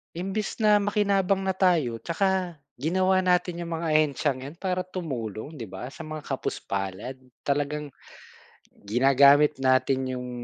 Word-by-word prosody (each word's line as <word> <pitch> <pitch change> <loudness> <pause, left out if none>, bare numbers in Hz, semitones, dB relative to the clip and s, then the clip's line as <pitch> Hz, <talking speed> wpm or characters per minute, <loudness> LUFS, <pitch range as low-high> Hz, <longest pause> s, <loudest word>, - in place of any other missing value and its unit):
Imbes 195 +6 -3
na 210 -1 +5
makinabang 200 -2 +2
na 190 - 0
tayo, 170 -11 +2
'tsaka 175 - -1 0.2
ginawa 185 +6 +1
natin 180 -1 +1
yung 165 -1 -4
mga 160 -2 0
ahensyang 145 -3 +1
'yan 140 +4 -8
para 185 -1 -1
tumulong 145 - -5
'di 125 - -6
ba, 95 +6 -6
sa 160 +4 -9
mga 155 0 -6
kapus-palad 100 -2 -4 0.3
talagang 145 +1 -1 1.0
ginagamit 140 +6 +5
natin 130 0 +2
'yong 125 0 -5
155 Hz, 130 wpm, -26 LUFS, 135-185 Hz, 1.0 s, na